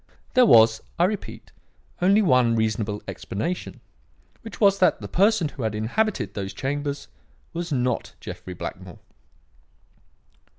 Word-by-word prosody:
There 255 -2 +6
was, 110 - +6 0.2
I 170 - +3
repeat, 205 +3 -3 0.5
only 200 +4 +4
one 125 - +4
reasonable 110 -2 -1
explanation; 170 - -5 0.6
which 225 -3 -10
was 200 -2 +4
that 185 - +3
the - - -7
person 195 -4 +2
who 135 - -9
had 110 -2 -1
inhabited 110 - -1
those 100 -1 -5
chambers 145 +1 -3 0.5
was 170 0 -4
not 125 -3 -1
Jeffrey 90 - -8
Blackmore. - - -7
140 Hz, 125 wpm, -24 LUFS, -, 0.6 s, There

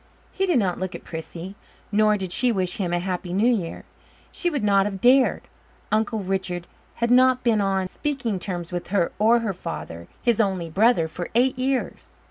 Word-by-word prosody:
He 385 0 -1
did 350 -6 +3
not 190 -6 0
look 185 -1 -4
at - - -9
Prissy, 165 +3 -7 0.4
nor 215 0 +3
did 190 -3 -4
she 245 +5 +2
wish 185 -4 -1
him 180 -4 -2
a 175 - +1
happy 180 0 -3
New 225 +6 +3
Year; 175 -7 -4 0.5
she 350 - 0
would 285 -8 -2
not 200 -1 +3
have 195 -2 -5
dared. 255 +4 +4 0.5
Uncle 215 0 0
Richard 185 -2 -2 0.3
had 235 0 0
not 255 0 +5
been 225 -4 +3
on 195 -1 0
speaking 245 -4 -3
terms 175 -2 -5
with 175 -1 -4
her 185 -3 +1
or 230 +3 +4
her 215 -4 -2
father, 85 - -7
his 235 -3 +2
only 185 -5 -1
brother, 205 -2 +3
for 175 +2 -6
eight 255 +2 +3
years. 260 0 -2
200 Hz, 190 wpm, -24 LUFS, 180-235 Hz, 0.5 s, not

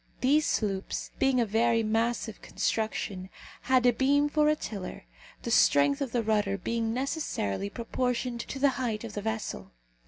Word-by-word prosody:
These 290 +4 +3
sloops, 195 -3 -2
being 270 -2 +3
of 230 -3 +1
very 230 +1 +2
massive 225 0 -1
construction, 200 -4 -2 0.3
had 255 -1 +2
a 245 - +5
beam 285 +4 +2
for 300 0 +2
a 305 - +3
tiller, 200 - -7 0.4
the - - -3
strength 145 - +4
of 270 -4 -2
the 235 -1 0
rudder 210 -2 +1
being 230 +1 -2
necessarily 240 - -2
proportioned 245 +1 -2
to 270 - -5
the 280 +1 +4
height 225 -4 -2
of 225 -2 -7
the 205 - -4
vessel. 220 - -4
230 Hz, 160 wpm, -28 LUFS, 215-260 Hz, 0.4 s, a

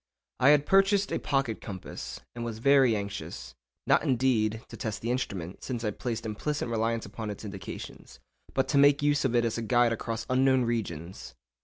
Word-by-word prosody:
I 130 +2 +6
had 145 -1 +5
purchased 195 +2 +3
a - - 0
pocket 135 -6 -1
compass, 95 -4 -7
and 120 - -5
was 115 -2 -4
very 135 -1 +5
anxious—not, 65 - -3
indeed, 120 -6 +1
to - - -9
test 110 -5 -4
the 115 - 0
instrument, 95 -8 -4
since 120 -3 -4
I 105 - 0
placed 115 +1 -4
implicit 120 +7 -2
reliance 115 0 0
upon 110 +1 -6
its 105 +1 -7
indications—but 95 - -6
to 145 - +2
make 145 +1 +5
use 145 -1 +2
of 120 -2 +1
it 120 0 +3
as 115 0 -1
a - - -3
guide 120 +1 +3
across 115 0 -4
unknown 130 0 +3
regions. 90 - -4
115 Hz, 175 wpm, -28 LUFS, 105-130 Hz, -, I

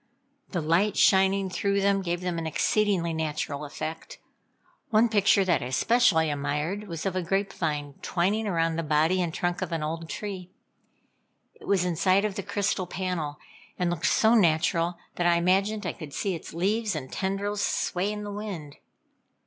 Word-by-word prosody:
The 175 - -2
light 170 +7 +2
shining 195 0 +4
through 200 +2 0
them 200 0 +2
gave 175 -1 -2
them 180 -2 -2
an 165 - -3
exceedingly 185 0 +1
natural 150 -2 -3
effect. 160 +2 -6 0.7
One 220 +2 +4
picture 200 -2 +4
that 175 - +2
I 125 - -3
especially 160 - +3
admired, 150 +8 -2
was 165 -1 -5
of 190 -1 -1
a 185 - 0
grape 195 +3 -1
vine 150 -4 -2
twining 200 +5 0
around 165 -3 0
the - - 0
body 160 +4 +2
and 170 -2 -1
trunk 175 0 -2
of - - -3
an 165 -2 -2
old 165 +1 -4
tree. 190 -4 -5 1.0
It - - -15
was 190 -3 +2
inside 185 +3 +2
of 210 - -1
the 200 - -4
crystal 200 -1 -1
panel, 175 -6 -3 0.4
and 180 -1 0
looked 175 -1 -1
so 220 +1 +4
natural 170 -3 +2 0.2
that 175 - +2
I 170 - +4
imagined 195 +4 +1
I 175 - -2
could 150 -4 -10
see 195 - -1
its 165 - -7
leaves 210 +4 0
and 130 -4 -6
tendrils 200 +2 -2
sway 185 +3 0
in 210 0 -5
the 205 0 -5
wind. 190 -9 -6
180 Hz, 175 wpm, -27 LUFS, 165-200 Hz, 1.0 s, shining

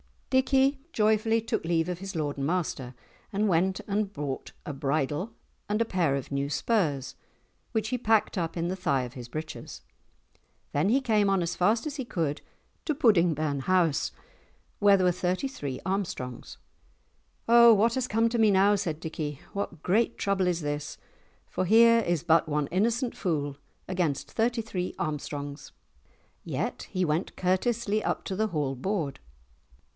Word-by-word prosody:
Dickie 265 +1 +3
joyfully 220 +1 +2
took 225 +1 -2
leave 165 0 +1
of 180 -1 -3
his 195 -1 -7
lord 145 -3 -2
and 140 0 -1
master, 155 -7 -2 0.4
and 205 +1 +1
went 185 +2 +1
and 205 0 -1
bought 140 -3 -5
a 150 - -4
bridle 145 +8 -1 0.4
and 210 +1 +1
a 230 - +2
pair 175 -9 +1
of 140 0 -5
new 140 0 -1
spurs 150 - 0 0.6
which 220 -1 0
he 250 - 0
packed 220 -2 +2
up 165 -2 -2
in 170 0 -1
the 185 - -1
thigh 140 -8 +1
of 125 0 -7
his 125 -2 -8
breeches, 155 +5 -7 0.9
then 145 +5 +1
he 255 +6 +3
came 215 -5 +2
on 195 -2 +2
as 170 +1 -2
fast 215 +6 +2
as 300 -1 -4
he 265 - -3
could 160 -9 -2 0.4
to 305 - 0
Pudding 185 - +4
burn 145 -2 -1
house, 170 -1 +2 0.7
where 200 -1 +6
were 180 -1 +3
thirty 180 +8 -1
three 140 - -5
Armstrongs. 180 -11 -4 0.9
"O 235 0 +8
what 220 +2 +3
has 260 -1 -1
come 225 +1 +2
to 235 0 -1
me 220 -1 +5
now?" 200 +1 +5
said 160 -5 -3
Dickie, 155 -3 -4
"what 190 -5 -4
great 225 +6 +2
trouble 195 -2 +1
is 175 -1 0
this? 145 0 -4 0.5
For 185 - -2
here 230 +4 +6
is 175 -8 0
but 165 -1 +4
one 150 -1 0
innocent 235 - 0
fool 145 -6 -2 0.3
against 175 -7 -1
thirty 230 +1 0
three 185 -5 -4
Armstrongs?" 145 -1 -5 0.7
Yet - - -3
he 185 -2 0
went 155 +3 -1
courteously 215 +4 0
up - - -1
to 190 - -4
the 220 +3 +1
Hall 150 -8 -2
board. 160 -1 -2
185 Hz, 165 wpm, -28 LUFS, 150-220 Hz, 0.9 s, O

